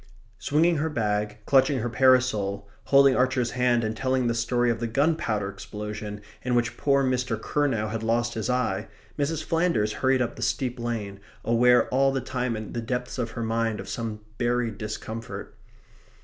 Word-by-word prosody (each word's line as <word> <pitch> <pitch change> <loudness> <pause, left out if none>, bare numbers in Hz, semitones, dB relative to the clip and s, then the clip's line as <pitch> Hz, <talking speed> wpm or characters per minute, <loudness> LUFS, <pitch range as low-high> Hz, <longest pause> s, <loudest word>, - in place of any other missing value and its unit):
Swinging 160 +3 +2
her 155 +2 0
bag, 105 -5 -1
clutching 135 0 +4
her 120 -1 -1
parasol, 120 -6 +2 0.2
holding 140 -1 +6
Archer's 130 -1 +1
hand, 125 -1 +2
and 110 0 -2
telling 130 +1 0
the 120 - +1
story 120 +1 +1
of 115 - -2
the 120 - -2
gunpowder 115 -5 0
explosion 105 +1 -6 0.2
in 125 -1 0
which 120 -1 +1
poor 140 +1 +2
Mr. 125 -3 0
Curnow 125 -4 0
had 110 +1 -4
lost 120 +1 0
his 110 +2 -3
eye, 125 -1 0 0.3
Mrs. 155 +2 -1
Flanders 165 -11 +1
hurried 130 0 +2
up 120 - -5
the - - -8
steep 125 -2 -1
lane, 110 -4 -4 0.3
aware 125 +1 +4
all 135 +1 +3
the 135 - -1
time 125 -2 -2
in 110 -1 -6
the 120 - -2
depths 125 +2 -3
of 120 -2 -1
her 115 - -1
mind 115 -1 0
of 95 - -7
some 110 +1 -4 0.2
buried 120 -3 0
discomfort. 110 +1 -6
120 Hz, 175 wpm, -26 LUFS, 110-130 Hz, 0.3 s, holding